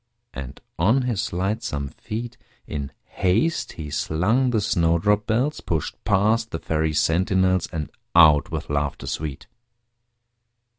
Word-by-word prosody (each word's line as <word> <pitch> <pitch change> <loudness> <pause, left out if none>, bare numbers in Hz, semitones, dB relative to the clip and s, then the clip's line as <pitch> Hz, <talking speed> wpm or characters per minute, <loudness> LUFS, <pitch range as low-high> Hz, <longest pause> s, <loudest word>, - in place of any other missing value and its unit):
And 70 0 -7 0.2
on 115 +10 +3
his 120 -5 -1
lightsome 90 - -2
feet 115 - -6 0.3
In 70 -2 -5
haste 110 - 0
he 75 -3 -7
slung 105 - +1
the 115 -3 +1
snowdrop 100 +1 +2
bells, 125 +7 0
Pushed 80 -3 -3
past 110 +4 +2
the 80 - -3
Fairy 80 -1 -1
sentinels, 95 +3 +2
And 80 -3 -4 0.2
out 75 -4 +7
with - - -4
laughter 70 -1 -2
sweet. 75 -3 -4
90 Hz, 120 wpm, -23 LUFS, 75-110 Hz, 0.3 s, out